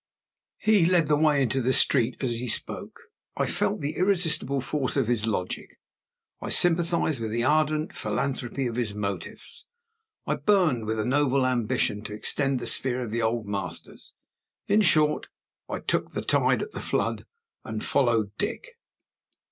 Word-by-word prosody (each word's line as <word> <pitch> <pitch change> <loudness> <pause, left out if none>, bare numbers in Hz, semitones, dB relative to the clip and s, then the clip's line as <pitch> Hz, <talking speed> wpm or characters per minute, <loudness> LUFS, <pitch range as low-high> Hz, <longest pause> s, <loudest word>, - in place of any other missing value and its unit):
HE 210 -6 +3
led 175 -3 +3
the 150 0 +2
way 150 -2 +3
into 135 +2 0
the 130 +2 +1
street 125 -3 +3
as 130 -3 -1
he 120 +2 -4
spoke. - - -4 0.4
I - - +1
felt - - 0
the 145 +2 -3
irresistible 175 -8 +1
force 135 +1 -2
of 135 - +2
his 115 -1 +1
logic. 90 -4 -4 0.6
I - - -5
sympathized 170 -4 +2
with 110 -1 -3
the 120 +2 -1
ardent 155 +2 +1
philanthropy 135 -1 -2
of 120 -1 -3
his 110 -4 -2
motives. 100 -1 -5 0.6
I - - -1
burned 170 - +2
with 110 +1 -1
a 110 - -1
noble 135 0 +2
ambition 115 -4 0
to 105 - -5
extend 135 +5 0
the - - -6
sphere 130 -1 +2
of 115 - -6
the 115 +1 -1
Old 110 0 -1
Masters. 100 -1 -5 0.5
In 210 +2 +4
short, 155 -5 +3 0.4
I - - -2
took - - -1
the - - -3
tide - - +2
at 430 - -8
the - - -6
flood, - - -2 0.4
and 110 -1 -5
followed 115 -6 +2
Dick. - - -4
130 Hz, 165 wpm, -26 LUFS, 115-155 Hz, 0.6 s, In